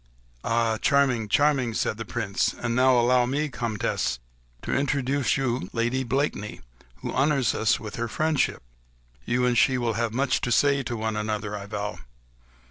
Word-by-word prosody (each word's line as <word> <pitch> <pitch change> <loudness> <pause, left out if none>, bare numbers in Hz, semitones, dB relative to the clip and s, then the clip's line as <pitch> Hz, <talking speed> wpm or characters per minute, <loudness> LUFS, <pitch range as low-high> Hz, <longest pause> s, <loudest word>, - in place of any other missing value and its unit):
"Ah! 115 -1 +1
charming!—charming!" 135 -1 +2
said 105 - -1
the 115 - -5
Prince, 105 -4 -1
"and 115 -1 -2
now 130 0 +5
allow 120 +1 +3
me, 145 +4 -1
Comtesse, 115 - -2 0.5
to - - -2
introduce 140 -1 +1
to 135 - -1
you, 120 -7 -2
Lady 120 +3 0
Blakeney, 130 -5 -2 0.4
who - - -3
honours 135 -2 +2
us 110 - +1
with 105 -1 -7
her 120 0 -2
friendship. 155 - 0 0.6
You 125 +1 +1
and 125 -1 +2
she 130 +2 +4
will 120 -2 0
have 115 +1 -1
much 130 +3 0
to 120 - -2
say 140 +2 +3
to 120 -2 -4
one 110 0 -2
another, 105 -1 -3
I 100 -1 -7
vow. 105 0 -4
120 Hz, 165 wpm, -25 LUFS, 110-135 Hz, 0.6 s, now